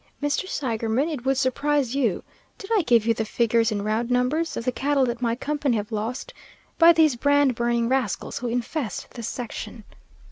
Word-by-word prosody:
Mr. 290 +6 -1
Seigerman, 235 +2 -1
it 260 -4 -6
would 270 0 +2
surprise 275 0 0
you 245 -9 0 0.3
did 390 - -10
I 415 - +4
give 235 -7 +3
you 230 - +3
the 220 - -2
figures 230 +1 +1
in 205 -1 -2
round 220 +3 -1
numbers 250 +7 0
of 230 - -4
the 255 - +1
cattle 275 +1 +1
that 240 0 -3
my 230 -1 +1
company 285 -2 -1
have 210 +2 -5
lost 225 +4 -4 0.5
by 335 0 +9
these 315 -5 +4
brand 285 +1 +3
burning 235 0 0
rascals 255 -6 -1
who 245 - -4
infest 245 +2 -3
this 235 -3 -6
section. 230 -2 -7
245 Hz, 185 wpm, -24 LUFS, 230-285 Hz, 0.5 s, by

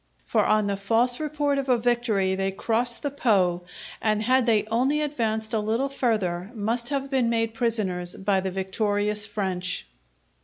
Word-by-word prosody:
For - - +2
on 215 -1 +3
the 200 -1 -1
false 230 +5 +2
report 290 -2 0
of 270 -1 -4
a 250 - +4
victory 230 -5 +1
they 195 0 0
crossed 230 +4 0
the 285 - -1
Po, 185 -10 +1 0.4
and 215 -1 +1
had 255 +1 +3
they 220 -3 +4
only 265 +6 +2
advanced 225 -7 -2
a 220 - +2
little 225 +6 0
further 210 -9 -1
must 230 +3 -1
have 275 -1 -2
been 255 -3 +2
made 225 -1 0
prisoners 205 -7 -1
by 195 0 +1
the 190 0 -2
victorious 205 +2 -1
French. 185 - -2
220 Hz, 165 wpm, -25 LUFS, 195-245 Hz, 0.4 s, a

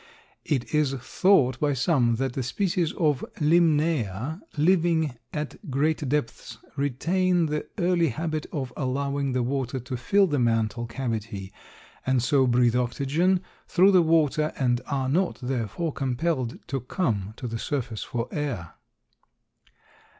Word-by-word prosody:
It 135 -4 -1
is 150 -3 +2
thought 130 -1 +2
by 145 -1 +1
some 130 -4 +2
that 130 +2 -2
the 135 - -2
species 170 - 0
of 150 -6 +1 0.2
Limnaea 155 - +2 0.2
living 160 -3 +2 0.2
at 150 +4 -6
great 145 +1 0
depths 145 -5 -2 0.2
retain 170 +6 +1
the 150 -1 -2
early 175 -3 +2
habit 155 +4 -3
of 130 -4 -4
allowing 140 0 -1
the 125 -1 +1
water 130 0 -2
to 125 +2 -5
fill 195 +12 +3
the 145 -6 0
mantle 115 0 0
cavity 115 -5 -4 0.5
and 130 -2 +1
so 130 +1 +3
breathe 120 -1 +3
oxygen 140 +9 +1 0.3
through 190 +3 +5
the 185 -2 +6
water 155 -2 +2
and 125 -2 +1
are 135 -2 -1
not, 175 +7 +1
therefore, 130 - -2
compelled 130 -1 -1
to 135 - -1
come 110 - -2
to 125 - -5
the 115 0 -4
surface 120 -6 -3
for 115 -1 -3
air. 125 - -3
140 Hz, 135 wpm, -26 LUFS, 125-160 Hz, 0.5 s, the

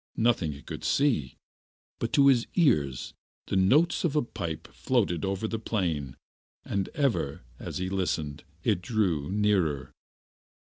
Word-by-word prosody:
Nothing 110 -10 +2
he 70 - -12
could - - -7
see, 120 - +1 0.6
but 115 - -2
to 140 -2 +6
his 130 -4 +5
ears 75 - +2 0.3
the - - -2
notes 130 - +4
of 160 -4 0
a 150 - +3
pipe 80 -8 -5
floated 105 -10 0
over 95 +2 -1
the 115 0 -3
plain, 85 - -2 0.5
and 100 -1 -1
ever, 120 - 0 0.2
as - - -5
he 90 - -2
listened, 85 -6 -2 0.2
it 85 - +1
drew 90 -9 0
nearer. 95 -9 +1
95 Hz, 140 wpm, -28 LUFS, 80-120 Hz, 0.6 s, to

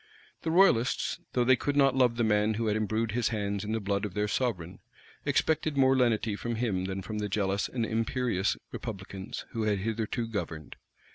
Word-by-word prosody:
The 165 - -2
royalists, 160 -9 +3
though 125 - +3
they 130 +2 +5
could 145 +3 -2
not 135 -2 +4
love 125 -3 +3
the 120 - +1
man 105 0 +2
who 115 +1 -1
had 105 -1 +1
imbrued 110 +1 0
his 115 +1 +1
hands 100 -3 -2
in 105 - -4
the 110 - 0
blood 100 0 -1
of 105 -3 -4
their 105 0 +1
sovereign, 95 -7 -2 0.5
expected 155 -2 +1
more 135 0 +5
lenity 115 -4 +2
from 120 +3 -3
him 105 -6 -1
than 95 0 -4
from 105 +2 -4
the 105 0 -2
jealous 100 0 0
and 120 -3 -1
imperious 115 -3 0
republicans, 95 0 -6
who 115 - -3
had 105 -2 +2
hitherto 110 +3 -2
governed. 85 -9 -5
110 Hz, 195 wpm, -29 LUFS, 100-120 Hz, 0.5 s, they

